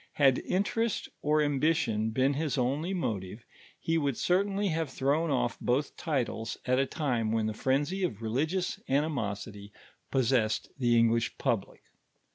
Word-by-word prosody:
Hod 135 -3 +5
interest 210 +4 0
or 150 +1 +3
ambition 140 -7 +1
been 130 +5 +2
his 150 0 -1
only 140 +8 0
motive, 110 - -3 0.4
lie 165 0 +3
would 140 -5 0
certainly 195 +2 +1
have 160 -2 -1
thrown 145 +5 0
off 120 -4 0
both 135 +4 0
titles 125 -8 -2
at 130 +1 +2
a 135 - +2
time 120 -7 -1
when 110 -1 +1
the 110 - -1
frenzy 145 - 0
of 115 - -1
religious 155 +11 -1
animosity 105 -8 -2 0.4
possessed 120 -4 +1
the 120 -2 +3
English 115 0 +2
public. - - -2
135 Hz, 140 wpm, -30 LUFS, 115-160 Hz, 0.4 s, Hod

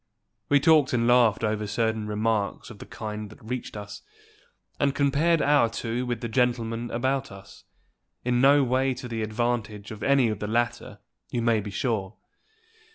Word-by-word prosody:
We 145 - +5
talked 155 -3 +4
and 115 -1 +2
laughed 120 -3 +4
over 105 -1 -1
certain 110 0 -1
remarks 105 0 -1
of 105 - -12
the - - -10
kind 105 -1 -6
that 110 - -15
reached 125 -2 -5
us, 105 -1 -8 0.8
and 140 0 +1
compared 145 +4 +2
our 145 -5 +4
two 115 +2 -3
with 120 -2 -3
the 120 - -3
gentlemen 120 -1 0
about 130 +2 -1
us, 100 0 -14 0.6
in 125 0 +2
no 140 +1 +6
way 130 +1 +1
to 125 0 -7
the 115 -2 -4
advantage 110 -1 -2
of 110 -1 -8
any 140 -4 +3
of 105 -2 -3
the 105 - -3
latter, 120 +2 -2 0.3
you 120 - -2
may 115 -2 +3
be 105 0 -6
sure. 105 -1 -2
115 Hz, 170 wpm, -26 LUFS, 110-130 Hz, 0.8 s, no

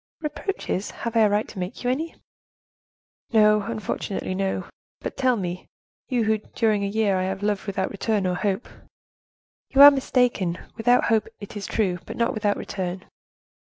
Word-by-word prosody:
"Reproaches! 300 - -3
Have 235 0 -5
I - - +5
a 215 -2 +5
right 205 +2 +1
to 200 - -9
make 180 +6 -5
you 245 - +1
any?" 315 +5 -3 1.2
"No, 210 -2 +5
unfortunately, 205 -3 -3
no; 190 -1 -1 0.3
but - - -5
tell 255 -2 +2
me, 180 -3 -4 0.4
you, 245 -3 +1
who 220 0 +2
during 215 -1 0
a - - 0
year 205 -1 +1
I 185 - 0
have 190 +1 -3
loved 205 0 -1
without 190 -1 -1
return 205 0 0
or 180 - +1
hope—" 195 +4 -1 1.0
"You 275 +1 +7
are 290 - +12
mistaken—without 245 -3 +1
hope 225 -2 +2
it 205 - -9
is 205 - -5
true, 185 -5 0
but - - -7
not 235 +2 +1
without 210 -3 0
return." 185 -1 -4
210 Hz, 165 wpm, -24 LUFS, 195-235 Hz, 1.2 s, are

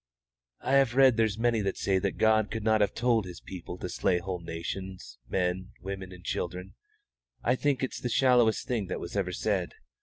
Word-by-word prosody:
"I 135 - -1
have 130 -3 +3
read 135 -2 +6
there's 110 -2 +1
many 115 -1 +2
that 100 -1 -1
say 95 -1 +1
that 100 0 -2
God 110 -1 +3
could 110 -1 -4
not 110 0 +3
have 100 -1 +1
told 115 -2 +2
His 90 -2 -8
people 90 -1 -8
to 90 - -5
slay 90 0 +1
whole 90 0 -4
nations, 85 -2 -6
men, 95 +1 -1
women, 95 -1 -6
and 90 -1 -12
children. 90 +2 -4 0.7
I - - +3
think 135 0 0
it's 130 - -2
the 125 - -2
shallowest 120 -3 +3
thing 115 -6 -1
that - - -3
was 85 - -7
ever 95 -2 0
said. 95 -1 -1
100 Hz, 200 wpm, -29 LUFS, 90-115 Hz, 0.7 s, read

